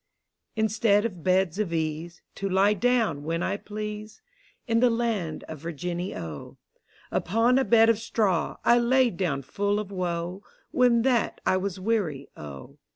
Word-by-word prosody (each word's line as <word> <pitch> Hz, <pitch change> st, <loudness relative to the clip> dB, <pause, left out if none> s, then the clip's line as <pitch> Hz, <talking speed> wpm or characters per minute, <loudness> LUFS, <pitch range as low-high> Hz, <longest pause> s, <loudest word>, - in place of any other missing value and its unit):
Instead 220 Hz, -1 st, +2 dB
of 185 Hz, -7 st, -4 dB
Beds 185 Hz, 0 st, +2 dB
of 205 Hz, -5 st, -1 dB
Ease, 160 Hz, +1 st, -3 dB
To 195 Hz, -, -3 dB
lye 195 Hz, +2 st, +4 dB
down 220 Hz, -, +1 dB
when 165 Hz, +2 st, -2 dB
I 200 Hz, -, 0 dB
please, 210 Hz, +1 st, -6 dB, 0.5 s
In 230 Hz, -2 st, +2 dB
the 250 Hz, +1 st, +5 dB
land 225 Hz, -9 st, -1 dB
of 155 Hz, -, -8 dB
Virginny, 175 Hz, +3 st, -4 dB
O: 80 Hz, -3 st, -7 dB, 0.5 s
Upon 230 Hz, +8 st, +2 dB
a -, -, +2 dB
bed 225 Hz, -3 st, +5 dB
of 230 Hz, -2 st, +3 dB
straw, 210 Hz, -6 st, 0 dB
I 240 Hz, 0 st, +6 dB
lay 250 Hz, +1 st, +3 dB
down 165 Hz, -7 st, -2 dB
full 205 Hz, +8 st, -1 dB
of 205 Hz, -2 st, -6 dB
woe. 180 Hz, 0 st, -3 dB, 0.3 s
When 240 Hz, -2 st, +4 dB
that 245 Hz, -4 st, +1 dB
I 185 Hz, -, +3 dB
was 190 Hz, 0 st, -3 dB
wear>', 205 Hz, -4 st, +1 dB, 0.2 s
O. 70 Hz, -2 st, -10 dB
200 Hz, 155 wpm, -26 LUFS, 170-230 Hz, 0.5 s, I